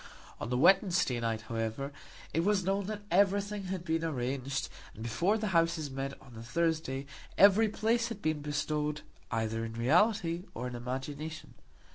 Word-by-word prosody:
On - - -4
the 125 - +1
Wednesday 175 - +4
night, 115 -2 -1
however, 115 +5 -3 0.4
it 165 - +1
was 200 0 +2
known 195 +1 0
that 210 -1 -5
everything 200 +2 +2
had 185 -1 -4
been 165 -1 0
arranged, 135 -2 -2 0.3
and 110 - -8
before 175 - +1
the 215 -2 -2
Houses 165 -4 +1
met 135 +1 -4
on 135 -2 -16
the 115 - -9
Thursday 140 +1 -1 0.3
every 205 +3 +7
place 230 +2 +1
had 230 -3 -6
been 155 -5 -1
bestowed, 150 +1 -1 0.3
either 115 0 -1
in 115 0 -5
reality 170 - +2
or 125 - -4
in 125 - -4
imagination. 135 +6 -5
155 Hz, 160 wpm, -31 LUFS, 125-190 Hz, 0.4 s, every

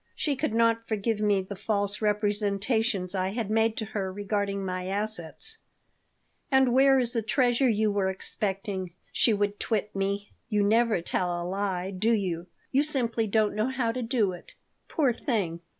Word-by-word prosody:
She 290 -3 0
could 270 -4 -1
not 230 0 +2
forgive 220 0 -1
me 205 -2 +2
the 200 +2 -7
false 205 0 -1
representations 210 -1 +1
I 190 -1 0
had 215 0 -3
made 225 0 +2
to 220 - -2
her 200 -3 -3
regarding 200 0 -2
my 185 0 -3
assets 210 - -2 0.9
"And 265 -3 +4
where 270 +1 +6
is 245 -2 +1
the 230 - +1
treasure 245 +3 +2
you 215 -1 +2
were 200 -2 +1
expecting?" 190 -1 -3 0.2
she 235 - +3
would 205 -1 0
twit 210 -3 -1
me. 200 +1 -2 0.2
"You 210 -2 +2
never 220 -3 +3
tell 175 0 -1
a 175 - -4
lie, 190 -1 -2
do 215 +5 +1
you? 180 -5 -1 0.2
You 275 - +4
simply 240 -7 0
don't 215 0 +2
know 215 +3 0
how 260 -3 0
to 255 +2 -4
do 225 -5 +1
it. 175 - -11 0.3
Poor 275 -6 +2
thing!" 200 - -1
210 Hz, 170 wpm, -27 LUFS, 195-230 Hz, 0.9 s, where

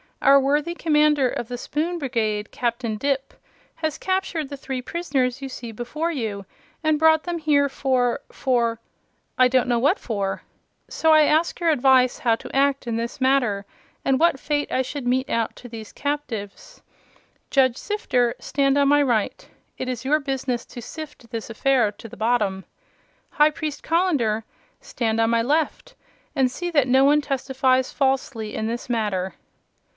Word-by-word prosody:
Our 275 0 +6
worthy 295 +5 0
Commander 300 -5 +3
of 240 - -4
the 245 0 -5
Spoon 320 +7 -2
Brigade, 220 -7 -2
Captain 235 -2 -2
Dipp, 275 +4 -1 0.4
has 315 -2 -2
captured 375 -6 -1
the 285 - -6
three 265 -1 -4
prisoners 275 -4 -1
you 270 - -5
see 235 -2 -7
before 295 +9 -3
you 215 -9 -4 0.4
and 310 -1 +2
brought 315 0 +5
them 350 -1 -3
here 290 -2 +2
for 255 -2 0
for 235 -3 0 0.6
I 255 0 +6
don't 255 0 +2
know 240 -1 +2
what 290 - +3
for. 200 -4 -3 0.4
So 320 - +1
I 310 -1 +7
ask 310 +3 +2
your 340 -2 +2
advice 260 -3 +4
how 230 -3 +2
to 225 - -10
act 275 0 +2
in 230 -1 -2
this 235 +3 -4
matter, 245 -7 +2 0.4
and 265 -1 +2
what 330 -4 +3
fate 290 0 -1
I 260 - +1
should 260 0 -5
mete 260 +2 +1
out 230 -1 -1
to 245 - -11
these 225 -2 -9
captives. 265 -9 -5 0.7
Judge 260 -3 +3
Sifter, 250 - 0
stand 275 0 +1
on 280 -1 +4
my 290 +1 +5
right. 235 -7 0 0.3
It 260 - -3
is 250 0 -4
your 300 +3 +3
business 265 -4 -3
to 240 - -9
sift 295 -1 -9
this 230 -2 -5
affair 235 -1 +2
to 215 - -11
the - - -12
bottom. 210 -4 0 0.7
High 300 0 +4
Priest 305 -1 -5
Colender, 290 -11 +1 0.4
stand 225 -2 -2
on 225 0 +3
my 230 0 +3
left 315 - -1 0.4
and 265 -3 +3
see 350 +6 -4
that 285 -5 +3
no 260 +2 +5
one 295 +1 +4
testifies 260 -2 0
falsely 265 -5 -1
in 220 - -2
this 235 +1 -4
matter." 205 -5 -1
265 Hz, 170 wpm, -23 LUFS, 235-295 Hz, 0.7 s, I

